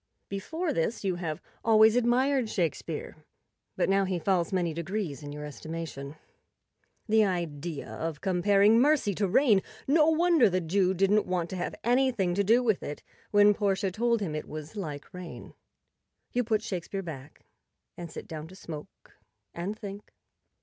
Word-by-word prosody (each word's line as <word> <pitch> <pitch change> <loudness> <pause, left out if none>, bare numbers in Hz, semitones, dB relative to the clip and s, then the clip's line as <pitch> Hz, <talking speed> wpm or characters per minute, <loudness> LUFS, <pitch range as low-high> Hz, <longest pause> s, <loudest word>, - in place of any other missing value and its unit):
Before 315 - -3
this 170 +8 -1
you 185 -3 0
have 160 -4 -4 0.2
always 220 0 +6
admired 245 +1 +2
Shakespeare, 170 -8 -3 0.6
but - - +2
now 195 0 +3
he 185 -1 -1
falls 175 0 +1
many 175 -4 0
degrees 170 -2 -3
in 145 -1 -7
your 150 0 -6
estimation. 150 -1 -6 0.9
The 220 0 +5
idea 170 -5 -3
of 160 -2 -4
comparing 200 +4 +4
mercy 280 -6 +3
to 200 +2 0
rain! 210 0 +4 0.3
No 305 +2 +5
wonder 330 - +4
the 185 0 +1
Jew 185 +2 +1
didn't 195 +3 +3
want 175 -2 -1
to - - -3
have 175 - -3
anything 240 -7 +2
to 200 +3 +1
do 230 +5 +4
with 220 -6 +1
it 145 - -6 0.3
when 205 0 +6
Portia 195 -2 0
told 235 +3 +1
him 170 -7 -2
it 155 - -4
was 155 +4 -7
like 155 -5 -6
rain. 180 -2 -9 0.8
You 245 - +1
put 220 -1 +1
Shakespeare 195 +1 -4
back, 145 -4 -9 0.5
and 175 -1 -7
sit - - -8
down 155 -1 -7
to 185 - -13
smoke 155 -5 -10 0.4
and 190 +5 -4
think. 205 -1 -9
195 Hz, 160 wpm, -28 LUFS, 165-220 Hz, 0.9 s, always